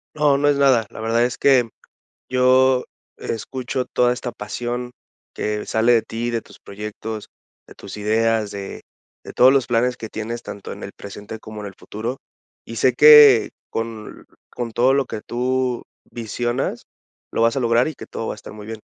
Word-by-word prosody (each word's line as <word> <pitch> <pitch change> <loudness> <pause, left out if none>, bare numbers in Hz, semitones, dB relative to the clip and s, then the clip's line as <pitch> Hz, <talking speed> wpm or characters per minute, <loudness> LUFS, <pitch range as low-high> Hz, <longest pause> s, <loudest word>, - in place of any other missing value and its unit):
No, 145 -2 +3
no 145 - +2
es 145 -1 +3
nada. 130 -5 +4
La - - -10
verdad 115 +2 +2
es 125 - -4
que 130 -4 +4 0.6
yo 130 0 +4 0.3
escucho 130 +2 -4
toda 125 0 +2
esta 125 -1 -4
pasión 120 +4 -4 0.4
que 105 0 -3
sale 115 +2 +3
de 115 - +4
ti, 115 +2 -4
de 115 -1 -1
tus - - -17
proyectos, 105 +1 -7 0.4
de - - -16
tus 100 - -9
ideas, 110 0 +1
de 100 -1 -7 0.4
de - - -10
todos 130 +1 +6
los 135 -2 +2
planes 120 +1 +1
que 110 - -6
tienes 115 +2 -5
tanto 100 -4 -8
en - - -8
el - - -7
presente 105 +2 -9
como 110 -1 -9
en 105 - -6
el 100 - -10
futuro 115 +6 -5 0.5
y 115 - -8
sé 125 +4 +3
que 150 -3 +8 0.2
con 115 -1 -6 0.3
con 120 -2 -5
todo 125 +4 +3
lo 140 -1 +2
que 110 - -6
tú 125 +1 -1 0.3
visionas 120 +2 -3 0.5
lo - - -1
vas 115 0 +3
a - - +2
lograr 120 +2 +3
y 155 - -8
que - - -10
todo 115 - -5
va - - -2
a - - -9
estar 105 - -11
muy 105 -1 -10
bien. 110 -1 -6
120 Hz, 190 wpm, -21 LUFS, 110-130 Hz, 0.6 s, que